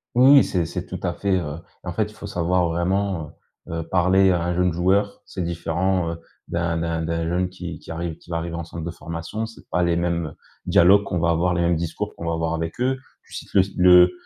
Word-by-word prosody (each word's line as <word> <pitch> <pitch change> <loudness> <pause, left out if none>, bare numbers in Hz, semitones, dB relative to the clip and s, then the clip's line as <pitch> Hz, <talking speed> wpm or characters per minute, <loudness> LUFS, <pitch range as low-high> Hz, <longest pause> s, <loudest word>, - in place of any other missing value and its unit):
Oui, 130 +3 +7
oui, 140 -2 +8
c'est 90 -3 0
c’est 90 +2 -5
tout 90 - -6
à 90 -2 0
fait, 100 +2 -1
heu 75 -3 -5 0.3
et - - -11
en 90 - -3
fait 105 +3 0
il - - -18
faut - - -9
savoir 90 -2 +1
vraiment, 90 0 0 0.4
heu, - - -6
heu, 80 - -9
parler 95 +2 +4
à 85 -2 +1
un 90 0 -1
jeune 90 -1 +2
joueur. 95 +4 +1
C'est 95 - -5
différent, 85 +1 0
heu, 85 - -6 0.3
d’un 85 -1 -1
d’un 80 0 -1
d'un 85 0 -1
jeune 90 +1 0
qui 90 -3 -7
qui - - -11
arrive 80 0 -4
qui - - -15
va 85 - 0
arriver 85 0 -4
en 85 - -4
centre 85 0 -7
de 85 - -3
formation. 85 +7 -5
C’est 115 - -14
pas 90 - +1
les 85 -1 +2
mêmes 85 -2 -1 0.3
dialogues 95 +4 +6
qu'on 90 -3 -2
va 85 +1 +2
avoir, 85 +2 +2
les 85 - 0
mêmes 85 0 +2
discours 80 0 -4
qu'on 85 - -7
va 85 - 0
avoir 80 0 -1
avec 80 +7 -4
eux. 130 +1 +1 0.3
Tu - - -18
cites - - -8
le 95 - +6
s 95 - -3
le 90 0 +7
85 Hz, 250 wpm, -23 LUFS, 85-95 Hz, 0.4 s, oui